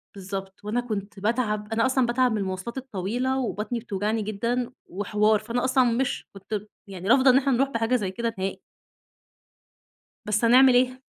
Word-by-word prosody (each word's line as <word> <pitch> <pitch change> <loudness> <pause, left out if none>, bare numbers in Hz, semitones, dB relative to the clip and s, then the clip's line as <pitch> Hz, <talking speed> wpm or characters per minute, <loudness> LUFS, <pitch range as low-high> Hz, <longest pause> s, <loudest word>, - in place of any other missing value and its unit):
بالضبط، 195 0 -6
وأنا 225 +4 -1
كنت 205 -4 -5
باتعب، 215 -1 -1
أنا 230 +2 +2
أصلًا 260 -1 +2
باتعب 245 +1 +2
من 220 - 0
المواصلات 190 +5 -4
الطويلة 250 +2 -2
وبطني 230 -1 -2
بتوجعني 215 0 -2
جدًا 235 +4 -2
وحوار، 210 +2 +1
فأنا 235 +3 -2
أصلًا 260 0 +3
مش 245 +3 -1
كنت 195 +1 -5 0.3
يعني 190 -1 -7
رافضة 260 +1 +6
إن 255 - +6
إحنا 275 0 +2
نروح 270 +3 +2
بحاجة 230 0 0
زي 195 -6 -1
كده 230 +3 -2
نهائي. 190 +1 -3 1.7
بس 210 +2 +1
هنعمل 255 +2 +7
إيه؟ 255 +1 +2
230 Hz, 160 wpm, -25 LUFS, 205-250 Hz, 1.7 s, هنعمل